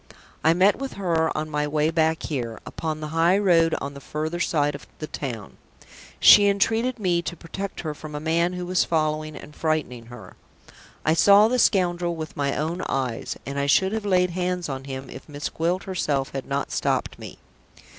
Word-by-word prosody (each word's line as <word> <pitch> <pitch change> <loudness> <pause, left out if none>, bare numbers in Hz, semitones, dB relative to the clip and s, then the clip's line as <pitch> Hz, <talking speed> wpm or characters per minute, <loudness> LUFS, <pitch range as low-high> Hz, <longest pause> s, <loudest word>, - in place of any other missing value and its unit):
I 160 +1 +4
met 190 +3 +4
with 270 0 -5
her 165 -5 0
on 155 0 -3
my 150 0 0
way 150 +1 +1
back 160 0 +1
here, 120 -7 -4
upon 155 -1 -4
the 155 - -5
high 165 +4 +3
road 170 -5 +3
on 140 0 -5
the 140 - -9
further 155 +4 -4
side 145 -4 +1
of 140 - -10
the 155 - -5
town. 120 -9 -6 0.6
She 205 -1 +8
entreated 225 +5 +1
me 180 -5 +1
to 175 - -5
protect 195 +4 -6
her 155 -2 -4
from 150 0 -9
a - - -3
man 165 +3 +1
who 180 0 -4
was 180 0 +2
following 155 -1 -1
and 150 +1 -11
frightening 145 -7 -2
her. 120 +1 -12 0.7
I 155 - +4
saw 200 +5 +6
the 250 +2 0
scoundrel 175 -5 +2
with 155 -2 -7
my 140 -1 -1
own 165 +4 -2
eyes, 130 -4 -2
and 140 +1 -4
I 140 - 0
should 190 +7 +3
have 220 0 -2
laid 180 -3 +2
hands 180 0 -2
on 135 -1 -5
him, 135 -1 -6
if 130 - -11
Miss 145 0 -4
Gwilt 175 +3 -1
herself 150 -8 -1
had 135 -1 -5
not 140 0 -2
stopped - - -1
me. - - -9
160 Hz, 195 wpm, -24 LUFS, 145-180 Hz, 0.7 s, She